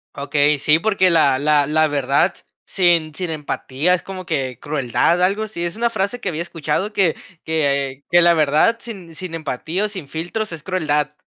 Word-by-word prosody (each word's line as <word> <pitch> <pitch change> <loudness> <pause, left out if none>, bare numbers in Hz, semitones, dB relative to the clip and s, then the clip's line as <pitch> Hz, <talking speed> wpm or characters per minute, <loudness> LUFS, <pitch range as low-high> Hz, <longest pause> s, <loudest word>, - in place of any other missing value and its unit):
Okey, 145 +1 +2
sí, 150 +3 +3
porque 190 -2 +2
la 140 -5 +4
la 145 0 +2
la 155 +1 +3
verdad, 140 +4 +1 0.3
sin 170 -4 +2
sin 180 +1 -4
empatía, 150 +1 -1
es 180 - 0
como 185 -1 -8
que 130 -6 -2
crueldad, 145 +4 0
algo 195 +4 +1
así, 210 -5 -5
es 170 0 -3
una 235 +1 0
frase 200 +4 -2
que 200 - -3
había 165 -1 -3
escuchado 170 +4 -3
que 190 -6 +2 0.3
que 140 -3 -1
que 175 +1 +5
la 170 - +6
verdad, 155 +8 +3
sin 190 -9 -10
sin 175 0 -6
empatía, 160 +6 -3
o - - 0
sin 185 -8 -8
filtros, 175 +8 -4
es 160 -2 -8
crueldad. 150 -5 -1
165 Hz, 185 wpm, -20 LUFS, 145-185 Hz, 0.3 s, la